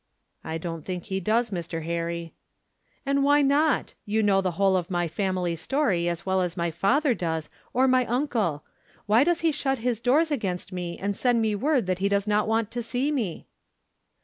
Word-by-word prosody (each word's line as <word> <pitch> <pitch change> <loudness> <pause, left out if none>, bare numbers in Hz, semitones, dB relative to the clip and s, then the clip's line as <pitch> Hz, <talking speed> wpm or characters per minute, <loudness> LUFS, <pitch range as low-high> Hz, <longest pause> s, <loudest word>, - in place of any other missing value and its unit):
"I 160 0 -3
don't 165 -1 -5
think 180 -2 -4
he 190 -2 -3
does, 225 +4 +1
Mr. 170 -3 -4
Harry." 170 0 -3 0.7
"And 275 0 +2
why 290 +1 +4
not? 285 +1 +2
You 215 +1 0
know 195 -2 +3
the 185 -2 -1
whole 195 -1 +3
of 180 0 -1
my 175 -2 0
family 180 -1 -1
story 180 - 0
as 170 0 -4
well 190 0 +1
as 180 -1 -2
my 170 -1 0
father 250 - +2
does, 160 -6 -3 0.2
or 260 +2 +3
my 255 -1 +3
uncle. 225 - 0 0.4
Why 220 +5 +5
does 345 +2 +1
he 330 -1 +3
shut 270 -2 -1
his 235 -1 -1
doors 290 +7 +2
against 195 -10 -2
me, 175 -1 -4
and 200 +1 -2
send 245 +1 +2
me 220 -1 +1
word 260 +3 +1
that 185 0 -1
he 200 +1 +1
does 200 0 +1
not 210 0 +1
want 225 -1 0
to 240 - -3
see 245 +5 -1
me?" 225 - -3
205 Hz, 200 wpm, -26 LUFS, 175-255 Hz, 0.7 s, Why